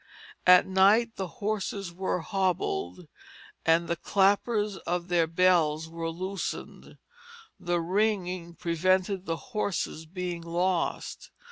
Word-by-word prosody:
At 180 0 +8
night 205 +5 +4
the 190 - -3
horses 200 -2 -3
were 185 0 -2
hobbled, 180 - -2 0.6
and 165 +1 +4
the 170 - 0
clappers 205 +3 +1
of 175 0 -3
their 170 -2 +3
bells 165 -2 +2
were 165 0 -4
loosened; 185 +2 -6 0.6
the 175 -1 0
ringing 180 -2 -1
prevented 185 +3 0
the 165 0 -1
horses 175 -6 -3
being 180 0 -4
lost. 170 +1 -2
180 Hz, 110 wpm, -28 LUFS, 170-195 Hz, 0.6 s, At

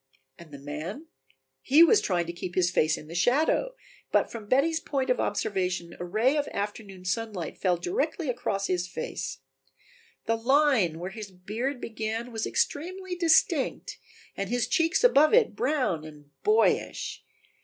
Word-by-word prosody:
And 170 -2 -13
the 140 - -8
man? 155 - -7 0.5
He 295 +5 +6
was 410 +5 +5
trying 175 -3 0
to 170 - -6
keep 175 +1 -6
his 180 -1 +2
face 155 -3 +2
in 150 - -11
the 165 - -9
shadow, 295 - +2 0.4
but - - +2
from 220 -3 -8
Betty's 305 +7 +2
point 270 -5 -1
of 250 - +1
observation 185 -4 -2
a - - -4
ray 220 +10 +1
of 290 - 0
afternoon 200 -2 -5
sunlight 190 -3 -3
fell 180 -2 +2
directly 360 - -2
across 235 -5 -1
his 180 -1 -1
face. 180 - -5 0.8
The 225 - +1
line 250 - +3
where 180 +3 -5
his 215 -1 -8
beard 220 +9 -4
began 225 +1 -4
was 225 -1 -2
extremely 370 +4 -2
distinct 335 -2 +2 0.4
and 195 -1 -3
his 245 0 0
cheeks 330 +5 +2
above 310 - +6
it 480 -2 +3
brown 260 - 0
and 150 -2 -13
boyish. 430 +2 +1
220 Hz, 155 wpm, -27 LUFS, 180-290 Hz, 0.8 s, He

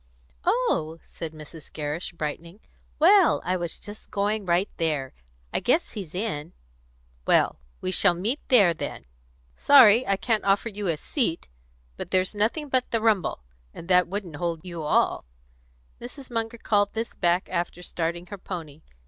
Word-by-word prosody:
"Oh!" 355 - +1
said 165 -2 -7
Mrs. 155 0 -12
Gerrish, 150 +3 -4
brightening. 165 +4 -6 0.4
"Well, 370 +3 +5
I 185 - +1
was 175 -2 -3
just 205 +1 -11
going 205 0 -1
right 175 +3 +2
there. 150 -5 -1 0.4
I - - +1
guess 315 +8 +1
he's 185 -7 -8
in." 180 -6 -3 0.7
"Well, - - +3 0.2
we 185 - -1
shall 185 -1 +4
meet 220 - -1
there, 205 -9 +6
then. 155 - -6 0.5
Sorry 250 -4 +7
I 195 - +3
can't 220 +1 0
offer 200 +3 +2
you 205 -2 -4
a 165 -3 0
seat. 170 - -1 0.5
But - - -6
there's 185 +1 +1
nothing 225 +9 0
but 260 -2 0
the 230 - 0
rumble, 215 - +1 0.3
and 170 - -9
that 180 -1 +5
wouldn't 185 -5 -5
hold 170 0 -3
you 170 -2 -6
all." 150 - +1 0.8
Mrs. 255 +2 -10
Munger 230 0 -3
called 205 -2 +1
this 225 +1 -4
back 175 0 +1
after 175 0 -3
starting 170 0 -3
her 195 +2 -9
pony. 160 -5 -7
185 Hz, 155 wpm, -25 LUFS, 170-225 Hz, 0.8 s, Sorry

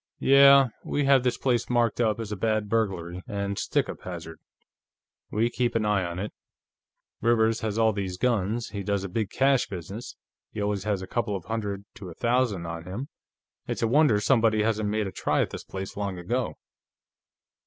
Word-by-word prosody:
"Yeah. 140 -1 +7
We 145 - -1
have 135 -1 +5
this 125 -1 0
place 120 -3 0
marked 120 -1 +2
up 110 -2 +1
as 110 -2 -5
a - - -1
bad 110 +1 0
burglary 95 -5 -1
and 100 -1 -3
stick - - 0
up - - -7
hazard; 85 -3 -7 0.9
we 110 +2 +1
keep 120 -1 0
an 110 -1 +1
eye 105 -2 +2
on 85 -1 -4
it. 100 +3 -4 0.9
Rivers 115 -1 +3
has 110 -1 -3
all 110 -1 +3
these 95 -3 -3
guns, 115 0 0
he 100 -1 -5
does 100 0 -1
a - - -3
big 105 +2 -2
cash 135 +2 +2
business, 95 +5 -7 0.4
he - - -6
always 100 -1 -1
has 100 -3 -1
a - - -7
couple 105 -1 -1
of 90 -4 -6
hundred 100 -2 -3
to 95 -3 -9
a 85 - -10
thousand 120 -7 +1
on 85 0 -6
him 110 +10 -5 0.6
it's - - -2
a - - +3
wonder 125 -4 +4
somebody 110 -2 +3
hasn't 110 -1 0
made 105 0 0
a 95 - -4
try - - 0
at - - -6
this - - -6
place 95 0 -7
long 100 -2 -3
ago.... 120 +8 -2
105 Hz, 195 wpm, -26 LUFS, 95-115 Hz, 0.9 s, Yeah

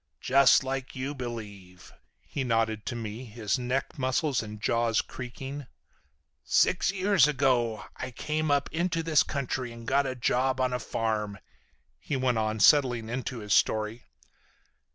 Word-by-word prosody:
Just 135 +1 +5
like 135 0 -4
you 135 +2 -3
believe," 105 -8 -8 0.3
he 140 - -3
nodded 115 -3 0
to 125 - -2
me, 115 +2 -6
his 110 -1 -2
neck 130 +3 -2
muscles 135 +1 +1
and 105 -1 -8
jaws 115 +1 +1
creaking. 135 +2 -6 0.8
"Six - - +3
years 195 -5 +4
ago 125 -6 +1
I 130 - -4
came 155 +5 -2
up 145 -1 +2
into 165 0 -1
this 160 -2 +4
country 130 -3 -3
and 115 0 -10
got 140 +2 +2
a 130 - -3
job 130 +2 +1
on 130 -1 +1
a 125 - -1
farm," 110 -4 -2 0.6
he 145 - -3
went 125 -3 +1
on, 110 0 -1
settling 125 -3 +4
into 125 0 -4
his 105 -1 -1
story. 110 +2 +1
125 Hz, 150 wpm, -28 LUFS, 115-135 Hz, 0.8 s, Just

